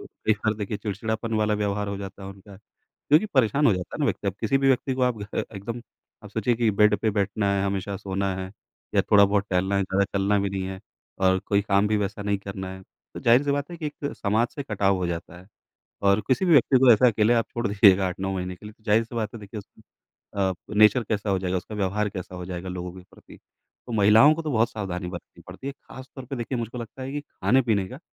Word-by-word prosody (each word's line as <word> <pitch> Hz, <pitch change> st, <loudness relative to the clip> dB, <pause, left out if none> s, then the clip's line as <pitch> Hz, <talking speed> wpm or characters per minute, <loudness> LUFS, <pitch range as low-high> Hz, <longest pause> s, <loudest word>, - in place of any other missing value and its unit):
कई 110 Hz, -, -2 dB
बार 110 Hz, +1 st, -1 dB
देखिए 105 Hz, 0 st, -4 dB
चिड़चिड़ापन 110 Hz, +2 st, -3 dB
वाला 105 Hz, 0 st, +1 dB
व्यवहार 105 Hz, -1 st, -1 dB
हो 100 Hz, -, -3 dB
जाता 100 Hz, 0 st, -8 dB
है 95 Hz, -, -7 dB
उनका 100 Hz, 0 st, -13 dB
क्योंकि 150 Hz, -, -1 dB
परेशान 135 Hz, +4 st, +3 dB
हो 115 Hz, -, +5 dB
जाता 90 Hz, -1 st, -6 dB
है -, -, -5 dB
ना, -, -, +2 dB
व्यक्ति -, -, -1 dB
अब 95 Hz, -, -3 dB
किसी 115 Hz, +4 st, +2 dB
भी 135 Hz, 0 st, +2 dB
व्यक्ति 130 Hz, 0 st, +1 dB
को 130 Hz, -, -2 dB
आप 125 Hz, -2 st, +2 dB
घ -, -, -4 dB, 0.3 s
एकदम 115 Hz, +5 st, -5 dB, 0.4 s
आप 105 Hz, -, -10 dB
सोचिए 110 Hz, +3 st, 0 dB
कि 115 Hz, -1 st, +2 dB
बेड 105 Hz, +1 st, +4 dB
पे 110 Hz, 0 st, +1 dB
बैठना 100 Hz, 0 st, -1 dB
है 100 Hz, 0 st, 0 dB
हमेशा 100 Hz, 0 st, -3 dB
सोना 95 Hz, 0 st, -2 dB
है 95 Hz, 0 st, -5 dB, 0.4 s
या -, -, +4 dB
थोड़ा-बहुत 100 Hz, 0 st, +4 dB
टहलना 95 Hz, +2 st, +1 dB
है 100 Hz, -, +2 dB
ज़्यादा 95 Hz, +1 st, +1 dB
चलना 100 Hz, +1 st, +2 dB
भी 100 Hz, 0 st, -1 dB
नहीं 95 Hz, -1 st, -3 dB
है 95 Hz, 0 st, -6 dB, 0.4 s
और 95 Hz, 0 st, +3 dB
कोई 100 Hz, -1 st, +2 dB
काम 100 Hz, 0 st, +2 dB
भी 110 Hz, -, +2 dB
वैसा 100 Hz, 0 st, -3 dB
नहीं 100 Hz, -1 st, 0 dB
करना 95 Hz, -1 st, -6 dB
है 95 Hz, -, -11 dB, 0.3 s
तो -, -, -6 dB
ज़ाहिर-सी 125 Hz, +5 st, +4 dB
बात 145 Hz, +3 st, -1 dB
है 170 Hz, -, -7 dB
कि 160 Hz, -, -4 dB
एक 145 Hz, -1 st, -5 dB
समाज 110 Hz, +3 st, +1 dB
से 140 Hz, -, -4 dB
कटाव 100 Hz, -5 st, +1 dB
हो 90 Hz, -1 st, -2 dB
जाता 85 Hz, 0 st, -5 dB
है। 95 Hz, -, -18 dB, 0.6 s
और 100 Hz, +2 st, +4 dB
किसी 135 Hz, +9 st, +2 dB
भी 175 Hz, -, +2 dB
व्यक्ति 135 Hz, -2 st, +5 dB
को 130 Hz, -2 st, +7 dB
ऐसा 120 Hz, +4 st, +5 dB
अकेले 110 Hz, 0 st, +3 dB
आप 115 Hz, -1 st, +2 dB
छोड़ 120 Hz, -1 st, -1 dB
दीजिएगा 100 Hz, -2 st, +5 dB
8-9 95 Hz, +2 st, -3 dB
महीने 90 Hz, 0 st, -4 dB
के 105 Hz, -, -15 dB
लिए 105 Hz, -, -9 dB
तो 110 Hz, -, -31 dB
ज़ाहिर-सी 110 Hz, +3 st, +1 dB
बात 110 Hz, -2 st, -2 dB
है 115 Hz, -, -8 dB
देखिए 105 Hz, +1 st, -9 dB
उसमें 100 Hz, -, -17 dB, 0.6 s
अ, 95 Hz, 0 st, +1 dB, 0.2 s
नेचर 110 Hz, +3 st, +6 dB
कैसा 105 Hz, -1 st, -2 dB
हो 95 Hz, -1 st, +1 dB
जाएगा, 90 Hz, 0 st, -1 dB
उसका 105 Hz, +4 st, -7 dB
व्यवहार 105 Hz, +1 st, 0 dB
कैसा 95 Hz, -2 st, -7 dB
हो 90 Hz, -1 st, -6 dB
जाएगा 90 Hz, 0 st, -6 dB
लोगों 90 Hz, -1 st, -5 dB
के 95 Hz, -, -11 dB
प्रति -, -, -16 dB, 0.5 s
तो -, -, -7 dB
महिलाओं 110 Hz, +7 st, +6 dB
को 165 Hz, -, -4 dB
तो 155 Hz, -2 st, -3 dB
बहुत 115 Hz, -1 st, +2 dB
सावधानी 95 Hz, -4 st, -4 dB
बरतनी 85 Hz, -2 st, -10 dB
पड़ती 135 Hz, -, -8 dB
है। 140 Hz, -, -4 dB
ख़ास 130 Hz, -1 st, -13 dB
तौर 135 Hz, -2 st, -8 dB
पे 135 Hz, +2 st, -5 dB
देखिए 120 Hz, +1 st, -3 dB
मुझको 120 Hz, +1 st, -5 dB
लगता 120 Hz, +3 st, -8 dB
है 130 Hz, -, -5 dB
कि 145 Hz, +1 st, -3 dB
खाने-पीने 120 Hz, -8 st, +1 dB
का 130 Hz, -, -10 dB
105 Hz, 245 wpm, -25 LUFS, 95-115 Hz, 0.6 s, को